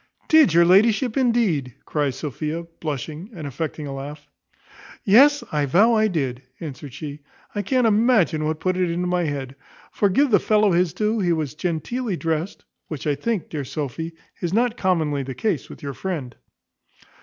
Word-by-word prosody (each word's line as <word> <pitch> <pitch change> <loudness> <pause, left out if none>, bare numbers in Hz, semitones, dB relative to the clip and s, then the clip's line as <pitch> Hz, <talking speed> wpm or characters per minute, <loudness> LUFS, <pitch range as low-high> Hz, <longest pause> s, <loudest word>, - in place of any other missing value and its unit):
"Did 315 - +6
your 170 0 +7
ladyship, 215 +6 +4
indeed?" 225 - +1
cries 145 -4 -1
Sophia, 150 +4 -4 0.2
blushing, 155 - -5
and 160 -4 -7
affecting 150 +2 -4
a 140 - -5
laugh. 145 +2 -8 0.8
"Yes, 275 +7 +6
I 150 -2 0
vow 205 - +5
I 220 -1 +4
did," 135 -10 -2 0.2
answered 145 -3 -7
she. 145 +2 -7 0.3
"I 205 - -1
can't 250 +4 +1
imagine 215 -8 +3
what 155 0 -1
put 185 0 0
it 180 -2 +1
into 175 +2 -1
my 180 -1 0
head: 135 -3 -4 0.4
for, 205 - +2
give 275 +8 +2
the 205 - +6
fellow 210 -2 +3
his 175 -1 +2
due, 215 +1 0
he 175 -4 +2
was 155 -4 -2
genteely 180 - -2
drest; 165 +3 -3 0.2
which, 155 -4 -6
I 150 - +2
think, 220 +5 -2
dear 150 -3 -4
Sophy, 155 +4 -4 0.3
is 175 0 -2
not 235 +1 +2
commonly 160 - 0
the 135 -1 -6
case 210 -9 -1
with - - -12
your 140 -1 -4
friend." 145 -7 -4
170 Hz, 175 wpm, -23 LUFS, 145-210 Hz, 0.8 s, your